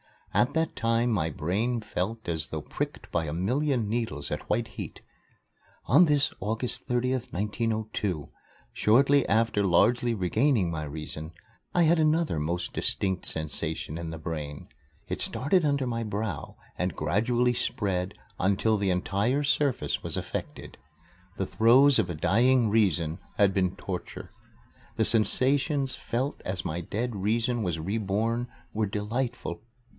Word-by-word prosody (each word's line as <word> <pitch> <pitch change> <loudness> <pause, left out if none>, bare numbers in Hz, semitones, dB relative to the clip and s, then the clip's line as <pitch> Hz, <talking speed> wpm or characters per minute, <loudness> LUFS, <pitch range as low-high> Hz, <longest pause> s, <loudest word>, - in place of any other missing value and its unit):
At 125 +4 +2
that 160 0 0
time 115 +1 +1
my 90 -7 +1
brain 105 - -1
felt 110 +2 -4
as 80 -4 0
though - - -4
pricked - - -5
by 85 -2 0
a 75 - -4
million 125 - 0
needles 110 -11 -3
at - - -4
white 115 0 0
heat. - - -8 0.8
On 155 +9 +6
this 145 -3 +2
August 115 +5 +1
30th, 125 0 -1
1902, 105 -4 -2 0.4
shortly 135 +5 +4
after 110 -2 +2
largely 115 +6 +3
regaining 105 - +2
my 80 -2 -3
reason, 75 +2 -7 0.4
I 175 - +5
had 165 +1 +4
another 155 - +2
most 85 +3 -2
distinct 95 -2 -1
sensation 80 0 -2
in 85 -1 -5
the 80 - -6
brain. 75 -3 -6 0.4
It - - -4
started 160 +5 +1
under 140 -2 +1
my 115 -2 -2
brow 105 0 -4 0.2
and 90 -1 -1
gradually 120 +10 +1
spread 95 -5 -1 0.2
until 100 +3 +2
the 100 -1 0
entire 100 +9 +1
surface 140 -2 +1
was - - 0
affected. - - -6 0.6
The 95 - -1
throes 125 +6 +5
of 95 -5 +1
a 85 - -3
dying 120 +8 +3
Reason 85 -7 +1 0.2
had 100 -1 +4
been 95 -1 +1
torture. 95 -2 -6 0.6
The - - +2
sensations 135 +4 +3
felt 130 +4 -3
as 95 -2 -3
my 85 +2 -2
dead 110 +5 -3
Reason 115 +4 0
was 90 -5 -1
reborn 110 +6 -1 0.3
were 110 -1 0
delightful. 110 -1 -3
110 Hz, 140 wpm, -28 LUFS, 90-125 Hz, 0.8 s, On